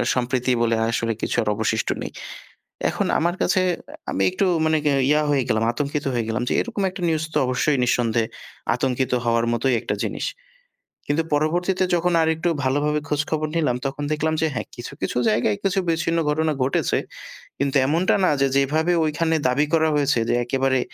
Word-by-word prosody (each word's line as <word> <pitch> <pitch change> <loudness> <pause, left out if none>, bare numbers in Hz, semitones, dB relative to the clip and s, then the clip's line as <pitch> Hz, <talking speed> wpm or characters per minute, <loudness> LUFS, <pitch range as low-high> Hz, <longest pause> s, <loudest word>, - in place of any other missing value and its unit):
সম্প্রীতি 125 0 0
বলে 115 -1 +2
আসলে 115 0 0
কিছু - - -1
আর - - -7
অবশিষ্ট্য 110 +1 0
নেই। - - -5 0.8
এখন - - -1
আমার 170 +2 +1
কাছে 185 - +2 0.5
আমি 95 - -1
একটু 195 - +1 0.2
মানে 155 0 +3 0.3
ইয়া 150 +1 +4
হয়ে 140 -2 +2
গেলাম 110 -2 +1
আতঙ্কিত 145 +3 -2
হয়ে 120 -2 0
গেলাম, 110 +2 -1
যে - - 0
এরকম 230 -4 -3
একটা 185 - -9
নিউজ 160 -1 0
তো - - +3
অবশ্যই 130 +3 +1
নিঃসন্দেহে 115 -2 +1 0.5
আতঙ্কিত 130 +1 -1
হওয়ার 115 0 +2
মতোই 125 +2 +1
একটা - - -2
জিনিস। - - -3 0.8
কিন্তু 145 +3 +1
পরবর্তীতে 175 +5 +1
যখন 175 +1 +1
আরেকটু 160 +1 +1 0.2
ভালোভাবে 145 +3 +1
খোঁজখবর 155 +1 -1
নিলাম 150 -7 +1
তখন 135 +2 -4
দেখলাম 155 +1 0
যে, - - +4
"হ্যাঁ, - - -3
কিছু, 120 - -7
কিছু - - -2
জায়গায় 105 -1 +1
কিছু 195 0 +1
বিচ্ছিন্ন 165 0 +1
ঘটনা 155 +1 +1
ঘটেছে"। 130 - +1 0.6
কিন্তু 140 +1 0
এমনটা 165 +6 +2
না - - +3
যে 140 - +4
যেভাবে 155 +5 +2
ঐখানে 160 +1 0
দাবি 130 +4 +2
করা 160 -1 +3
হয়েছে 145 -3 +2
যে - - +3
একেবারে 130 +1 +1
145 Hz, 170 wpm, -22 LUFS, 125-160 Hz, 0.8 s, ইয়া